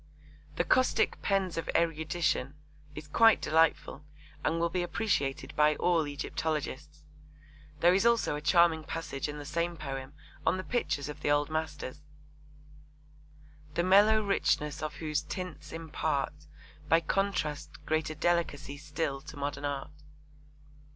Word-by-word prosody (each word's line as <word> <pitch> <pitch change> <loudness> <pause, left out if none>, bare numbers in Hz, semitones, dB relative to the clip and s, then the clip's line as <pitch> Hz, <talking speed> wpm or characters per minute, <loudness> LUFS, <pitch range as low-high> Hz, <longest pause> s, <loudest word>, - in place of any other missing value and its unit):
'The - - +1
caustic 255 0 +2
pens 195 -3 0
of - - -5
erudition' 160 -4 0 0.4
is 150 +1 -8
quite 225 +8 +5
delightful 160 -2 +1 0.4
and 165 +2 +1
will 170 - +2
be 180 - 0
appreciated 175 -7 -1
by 150 0 +4
all 165 -3 +2
Egyptologists. 150 0 -4 0.8
There 175 +1 +6
is 195 - +3
also 235 -9 +3
a 150 - -5
charming 165 0 +4
passage 155 -3 -4
in 150 - -5
the 145 - -7
same 170 +3 -2
poem 135 -2 -6 0.3
on - - +2
the 185 - -4
pictures 185 - -1
of 150 - -7
the - - 0
Old 145 +1 +2
Masters: 150 -3 -4 1.7
the 170 - +2
mellow 205 +4 +5
richness 150 -7 0
of 155 -1 -4
whose 155 -2 -1
tints 185 -2 -7
impart, 155 -3 -2 0.6
By 165 - +6
contrast, 155 -5 -2
greater 155 0 -1
delicacy 155 -4 0
still 150 -1 -3
to 150 +1 -11
modern 140 0 -3
art. 140 0 -3
155 Hz, 135 wpm, -30 LUFS, 145-175 Hz, 1.7 s, There